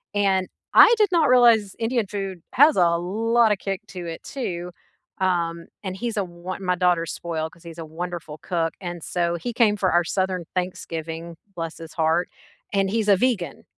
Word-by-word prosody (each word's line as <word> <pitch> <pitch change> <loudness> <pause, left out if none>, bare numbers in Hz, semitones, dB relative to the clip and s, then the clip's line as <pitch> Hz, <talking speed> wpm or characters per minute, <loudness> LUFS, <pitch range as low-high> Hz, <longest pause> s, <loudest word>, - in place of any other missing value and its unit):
and 190 -2 +2 0.3
I 470 - +9
did 425 -3 +4
not 325 -6 +3
realize 230 -5 +5
Indian 230 -2 0
food 195 -3 -5
has 290 +3 +6
a 175 -2 +5
lot 225 +6 +2
of 205 - +2
kick 195 +1 -4
to 180 -2 -7
it 165 -1 -6
too, 180 -9 -5 0.5
um, 170 -3 0 0.2
and 190 -2 -4
he's 230 0 -3
a 200 - +2
wo 175 +1 -7
my 180 -1 0
daughter's 175 -2 +1
spoiled 160 -2 -3
because 170 - -20
he's 170 -1 -10
a 160 - -5
wonderful 165 -1 -6
cook, 165 -4 -1
and 175 -2 -5
so 170 -1 -1
he 235 +8 -4
came 220 -3 +3
for 185 -2 +1
our 175 0 +4
southern 185 0 -1
Thanksgiving, 165 -2 -4 0.2
bless 165 -1 -5
his 165 -1 -10
heart, 165 +2 +1 0.4
and 195 -1 +2
he's 215 +1 0
a 195 - +6
vegan. 190 - -1
180 Hz, 185 wpm, -24 LUFS, 170-205 Hz, 0.5 s, I